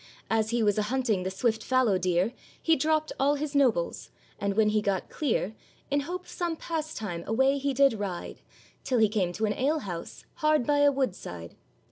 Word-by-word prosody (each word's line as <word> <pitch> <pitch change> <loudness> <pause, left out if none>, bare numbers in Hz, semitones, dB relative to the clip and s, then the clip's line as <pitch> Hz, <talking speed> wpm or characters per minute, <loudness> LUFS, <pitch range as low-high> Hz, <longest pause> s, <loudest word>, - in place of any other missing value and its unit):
As 220 -1 +2
he 235 -1 +1
was 205 0 +2
a 210 0 -1
hunting 245 -7 +1
the 185 - -2
swift 220 +4 0
fallow 255 -7 +2
deer, 180 +5 +1 0.3
He 325 - +3
dropped 310 +2 +1
all 280 +2 +3
his 290 0 -3
nobles; 245 -12 +1 0.3
and 200 -1 -1
when 215 0 +4
he 215 0 +2
got 200 -3 -1
clear, 230 -8 -1 0.4
In 285 - +3
hope 355 +6 -4
of - - -23
some 345 -2 -2
pastime 300 - -4
away 265 +5 +2
he 280 +1 0
did 275 0 +4
ride, 200 -5 -5 0.4
Till 255 - 0
he 220 -1 +5
came 200 -4 0
to 215 +5 -1
an 210 - 0
alehouse, 255 - -3
hard 305 -5 +2
by 290 -1 +2
a 285 0 +6
wood 265 -7 0
side. 85 - -9
235 Hz, 195 wpm, -28 LUFS, 200-285 Hz, 0.4 s, a